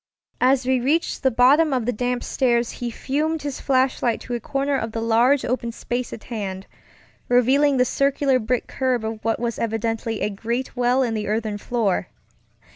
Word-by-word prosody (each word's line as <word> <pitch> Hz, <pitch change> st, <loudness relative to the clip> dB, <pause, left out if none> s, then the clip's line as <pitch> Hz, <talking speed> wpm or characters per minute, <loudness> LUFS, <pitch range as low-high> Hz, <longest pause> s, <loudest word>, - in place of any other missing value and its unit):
As 255 Hz, 0 st, +3 dB
we 260 Hz, 0 st, +2 dB
reached 300 Hz, +7 st, 0 dB
the 265 Hz, -, +3 dB
bottom 270 Hz, +6 st, +4 dB
of 250 Hz, -4 st, 0 dB
the 245 Hz, -, 0 dB
damp 245 Hz, +2 st, -2 dB
stairs 240 Hz, -2 st, +1 dB
he 240 Hz, -1 st, -2 dB
turned 305 Hz, +6 st, -2 dB
his 285 Hz, -2 st, -4 dB
flashlight 260 Hz, -3 st, +1 dB
to 245 Hz, -, -6 dB
a 240 Hz, -, -1 dB
corner 275 Hz, +4 st, -1 dB
of 225 Hz, -4 st, -3 dB
the 225 Hz, -, -2 dB
large 235 Hz, +5 st, +3 dB
open 240 Hz, -1 st, -2 dB
space 245 Hz, +1 st, -4 dB
at 225 Hz, -, -8 dB
hand, 195 Hz, -4 st, -5 dB, 0.6 s
revealing 265 Hz, +3 st, +4 dB
the 250 Hz, -, +4 dB
circular 275 Hz, 0 st, +1 dB
brick 245 Hz, +2 st, -1 dB
curb 255 Hz, -4 st, -1 dB
of 220 Hz, 0 st, -5 dB
what 225 Hz, 0 st, 0 dB
was 235 Hz, -1 st, -2 dB
evidently 225 Hz, 0 st, -2 dB
a 210 Hz, -, 0 dB
great 235 Hz, +6 st, -3 dB
well 250 Hz, +1 st, +2 dB
in 235 Hz, -3 st, -1 dB
the 215 Hz, -1 st, -3 dB
earthen 215 Hz, 0 st, -2 dB
floor. 220 Hz, -5 st, -1 dB
245 Hz, 185 wpm, -22 LUFS, 225-265 Hz, 0.6 s, bottom